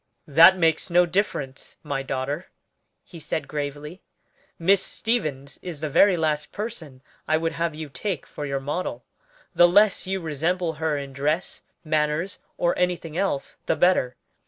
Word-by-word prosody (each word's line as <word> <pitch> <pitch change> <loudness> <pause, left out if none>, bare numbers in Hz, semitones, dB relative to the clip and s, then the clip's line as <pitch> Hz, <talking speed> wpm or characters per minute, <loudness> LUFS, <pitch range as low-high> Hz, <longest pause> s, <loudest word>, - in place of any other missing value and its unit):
"That 165 +6 +7
makes 165 0 +1
no 175 +1 +5
difference, 165 -8 -2
my 135 -3 -2
daughter," 135 +5 -3 0.6
he 170 - -12
said 155 - -3
gravely. 150 +4 -5 0.6
"Miss 190 +3 +4
Stevens 155 - -2
is 175 -5 -6
the 155 0 -3
very 195 +4 +5
last 155 -2 -1
person 165 - -6 0.2
I 155 - +3
would 165 0 -1
have 165 -1 -2
you 155 0 -6
take 170 +2 -4
for 150 - -8
your 140 0 -1
model; 145 +7 -4 0.5
the 175 - +7
less 200 +2 +4
you 190 0 -1
resemble 165 +2 -1
her 160 -2 +1
in 140 -1 -6
dress, 150 +6 -1 0.2
manners, 155 +3 -1 0.2
or 175 - +1
anything 175 -3 -1
else, 180 -7 -2
the - - +2
better. 155 -9 +2
160 Hz, 155 wpm, -24 LUFS, 145-180 Hz, 0.6 s, That